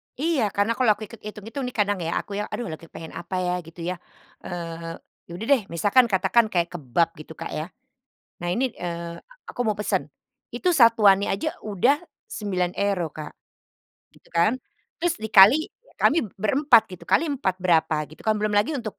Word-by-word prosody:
Iya, 300 -3 0
karena 205 +3 +2
kalau 255 -3 +3
aku 215 - -9
ikut 230 - -12
itung-itung 220 +6 -6
nih, 250 - -7
kadang 205 -2 +2
ya, 165 - -2
aku 205 - -16
ya, 210 - -1
"Aduh, 240 - -3
lagi 160 +1 -8
kepengen 160 0 -10
apa 175 +2 -6
ya?" 180 - 0
Gitu 165 +1 -11
ya. 180 - -2 0.5
Eee, 165 -1 -6 0.3
ya - - -13
udah 215 +6 -6
deh, 270 -4 +5
misalkan 205 +9 +4
katakan 195 +4 +3
kayak 170 -1 +2
kebab, 165 +1 0
gitu, 155 +1 -10
Kak, - - -6
ya. 155 - -3 0.8
Nah, 175 - -3
ini, 255 0 0
eee, 170 -1 -6 0.3
aku - - -8
mau 215 -2 +1
pesan. 210 - -1 0.5
Itu, 360 - +1
satuannya 220 -6 +5
aja 195 - -2
udah 215 - +2 0.3
€9 185 -3 -1
Kak, 155 - -7 0.8
gitu - - -23
kan. 170 +7 +4 0.5
Terus 345 -1 +1
dikali 220 +7 +6 0.3
kami 335 - +4 0.2
berempat, 250 +1 +5
gitu, 175 -2 -10
kali 325 +2 +2
4, 265 -10 -1
berapa? 165 -3 +3
Gitu 155 - -16
kan, 220 - +4
belum 215 - 0
lagi 210 +9 +2
untuk, 220 -7 -5
200 Hz, 175 wpm, -24 LUFS, 170-230 Hz, 0.8 s, dikali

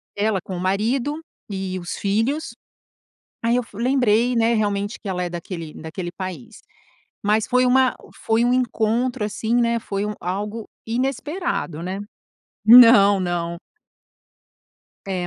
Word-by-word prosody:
Ela 205 -1 +1
com 185 - -7
o - - -5
marido 235 - 0 0.3
e 190 -2 -4
os 175 -1 -6
filhos, 230 +9 -1 0.9
aí 230 +1 +2
eu 250 - +1
f 225 - -16
lembrei, 245 -1 +2
né, 230 0 +2
realmente, 205 -1 -1
que 210 - -7
ela 180 -1 -2
é 175 - -3
daquele, 170 -2 -6
daquele 170 +3 -6
país. 185 -9 -8 0.6
Mas 215 +2 +2
foi 255 0 +3
uma 260 0 +3 0.2
foi 225 +1 0
um 245 - +2
encontro 245 -1 0
assim, 220 +2 -2
né, 235 -1 +2
foi 200 -3 -3
um 210 - -3
algo 205 +5 -4 0.2
inesperado, 270 - -2
né? 185 +3 -4 0.7
Não, 230 -4 +8
não. 170 -1 -2 1.5
É, 185 -2 -2
215 Hz, 140 wpm, -22 LUFS, 190-245 Hz, 1.5 s, Não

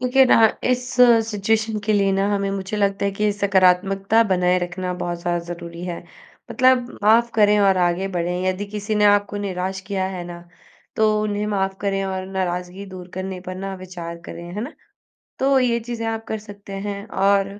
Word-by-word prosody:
क्योंकि 255 +1 +4
ना - - +5 0.3
इस 250 0 +1 0.5
सिचुएशन 220 +1 0
के 215 - +1
लिए 195 -1 +2
ना 195 +1 +1
हमें 200 0 -1
मुझे 195 +1 -4
लगता 200 -1 0
है - - +1
कि 210 +1 +1
सकारात्मकता 195 +2 +3
बनाए 180 0 +3
रखना 180 +1 -3
बहुत 175 -1 -4
ज़्यादा 175 0 -1
ज़रूरी 170 0 -7
है, 175 -2 -5 0.5
मतलब 255 -1 +3
माफ़ 230 +2 +5
करें 210 -1 +4
और 195 -1 +4
आगे 180 +2 +1
बढ़ें, 180 0 -2
यदि 185 +2 -1
किसी 210 +1 -4
ने 210 0 +3
आपको 205 0 +3
निराश 190 -1 -3
किया 190 -2 -1
है 175 - -5
ना, 175 0 -8 0.6
तो 215 -1 +3
उन्हें 210 0 -1
माफ़ 195 -2 -1
करें 195 -1 -1
और 190 -1 -3
नाराज़गी 185 0 -3
दूर 185 -1 -10
करने 185 0 -5
पर 185 - -4
ना 195 0 -5
विचार 175 -2 -8
करें, 170 - -8
है 210 - -3
ना? 285 - -6 0.7
तो 270 0 +3
ये 235 -2 +2
चीज़ें 230 0 -5
आप 225 0 -3
कर 220 - -2
सकते 200 -1 -11
हैं। 200 +1 -5
और 195 0 +1
195 Hz, 190 wpm, -22 LUFS, 185-210 Hz, 0.7 s, ना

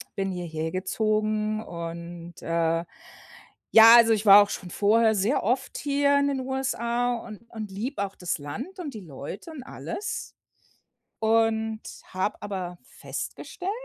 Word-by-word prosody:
Bin 195 -1 -1
hierher 160 -3 -4
gezogen 215 +2 0
und, 170 0 -8
äh 165 0 0 0.9
ja, 225 +1 +10
also 230 -1 +6
ich 215 0 -1
war 200 0 +10
auch 205 - +1
schon 180 -2 -6
vorher 220 +3 +3
sehr 210 +8 +1
oft 245 +6 -1
hier 285 0 +2
in 280 - +2
den 275 -1 -1
USA 245 -2 -1
und 220 -3 -9
und 215 -2 -6
liebe 215 +4 -3
auch 195 - -10
das 175 -3 -3
Land 255 - -7
und 295 -8 -6
die - - -5
Leute 165 - -8
und 305 -4 -8
alles 390 +8 -6 0.8
und 220 0 +1 0.2
habe 185 +3 -2
aber 185 -3 -4
festgestellt, 370 +2 -6
215 Hz, 145 wpm, -26 LUFS, 180-235 Hz, 0.9 s, ja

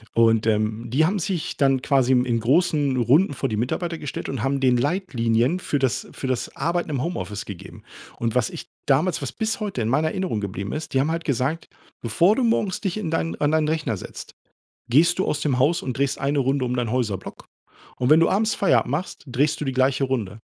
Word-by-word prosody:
Und, 115 -1 +4
ähm, 110 +1 0
die 140 +7 +3
haben 195 +5 0
sich 180 -2 -3
dann 135 -2 +2
quasi 130 -2 +3
im 125 0 +3
in 120 -2 0
großen 145 +2 +2
Runden 140 - +3
vor - - -1
die 110 - -2
Mitarbeiter 165 +8 -2
gestellt 145 - -5
und 135 -5 -4
haben 135 +3 0
den 130 -2 +3
Leitlinien 125 - +1
für 150 - -1
das 130 -3 -1
für - - -7
das 130 -2 -2
Arbeiten 170 +4 -1
im 140 -4 -1
Homeoffice 105 - -4
gegeben. 100 -4 -10 0.3
Und 115 -1 -1
was 125 -2 +1
ich - - -9 0.2
damals 155 +6 +2
was 135 -4 -4
bis 220 - -2
heute 205 - -3
in 110 - -1
meiner 145 +5 +2
Erinnerung 180 - -2
geblieben 100 0 -4
ist. 155 -2 -5
Die - - +4
haben 145 +4 +1
halt 165 0 -3
gesagt: 140 +5 -1 0.3
„Bevor 170 - +3
du 260 - 0
morgens 215 -5 +1
dich 195 -2 -2
in 185 -7 -3
dein 165 0 -2
an 145 0 +2
deinen 155 -1 +2
Rechner 150 -8 -1
setzt, - - -9 0.6
gehst 165 +9 +4
du 190 - +1
aus 150 - -1
dem 135 -4 0
Haus 150 +6 +2
und 130 -1 -4
drehst 140 -1 0
eine 140 +1 0
Runde 135 0 +1
um 125 0 -1
deinen 120 -2 -1
Häuserblock. 115 -7 -3 0.5
Und 125 +2 0
wenn 155 +2 +7
du 165 - +4
abends 215 +2 +1
Feierabend 130 - +2
machst, 155 +7 -4
drehst 145 +4 0
du - - -2
die 135 - -2
gleiche 130 +1 +2
Runde.“ 115 -6 -3
135 Hz, 220 wpm, -23 LUFS, 120-165 Hz, 0.6 s, wenn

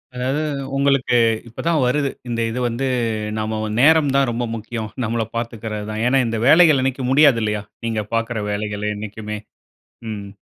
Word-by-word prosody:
அதாவது, 130 +4 -1 0.4
உங்களுக்கு 140 -3 +2 0.3
இப்ப 115 - -13
தான் 165 -2 +3
வருது. 140 +2 +1 0.2
இந்த 115 -1 -2
இது 120 +3 -3
வந்து, 120 +3 -2 0.5
நாம 110 0 -2
வ - - -2
நேரம் 150 +1 +5
தான் 135 -2 +3
ரொம்ப 120 +1 -2
முக்கியம், 110 0 -5 0.2
நம்மள 115 0 -1
பாத்துக்கிறது 110 -3 -4
தான். 110 0 -3
ஏன்னா, 135 +2 +3
இந்த 115 0 -2
வேலைகள் 160 -4 +6
என்னைக்கும் 130 -1 -1
முடியாது 140 -4 +5
இல்லையா? 105 -1 -1 0.2
நீங்க 110 -2 -1
பாக்குற 115 -1 -1
வேலைகள் 105 0 -2
என்னைக்குமே. 105 0 -6 0.7
ம். 100 -2 -6
115 Hz, 160 wpm, -20 LUFS, 110-135 Hz, 0.7 s, வேலைகள்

